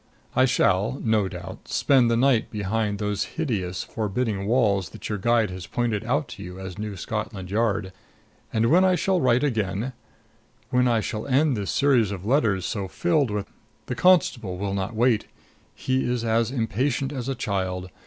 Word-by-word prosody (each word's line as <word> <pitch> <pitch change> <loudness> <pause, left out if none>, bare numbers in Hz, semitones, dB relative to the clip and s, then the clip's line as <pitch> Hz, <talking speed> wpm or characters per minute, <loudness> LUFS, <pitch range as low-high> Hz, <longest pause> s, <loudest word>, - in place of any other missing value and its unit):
I 130 - +5
shall, 110 0 +2
no 110 -3 +2
doubt, 90 -2 -9
spend 130 -4 +3
the 115 - +2
night 125 -2 +3
behind 105 0 -1
those 105 -1 -1
hideous, 95 - -2
forbidding 105 -2 -2
walls 105 -6 +2
that - - -8
your 105 -1 -2
guide 115 -1 +2
has 90 -1 -7
pointed 115 -4 -1
out 140 +6 0
to 105 - -9
you 90 -1 -8
as 95 0 -7
New 105 -2 -4
Scotland 105 -1 -4
Yard. 105 -3 0 0.6
And 115 +2 +2
when 180 +3 +6
I 185 -1 +4
shall 185 0 +1
write 125 +1 +3
again, 110 -2 -1 0.8
when 125 -1 +3
I 115 -2 +2
shall 110 +2 -4
end 140 +1 +3
this 100 -3 -3
series 130 -7 +3
of 100 -2 -6
letters 110 -7 +2
so 100 -3 -3
filled 155 - +1
with 105 -1 -2 0.4
The - - -3
constable 125 - +3
will 100 +1 -2
not 100 +3 -3
wait. 115 -1 +2 0.5
He 130 0 0
is 125 -2 -1
as 115 0 +2
impatient 130 +3 -1
as 130 -1 -4
a 135 - -1
child. 95 -4 -3
110 Hz, 175 wpm, -25 LUFS, 100-125 Hz, 0.8 s, when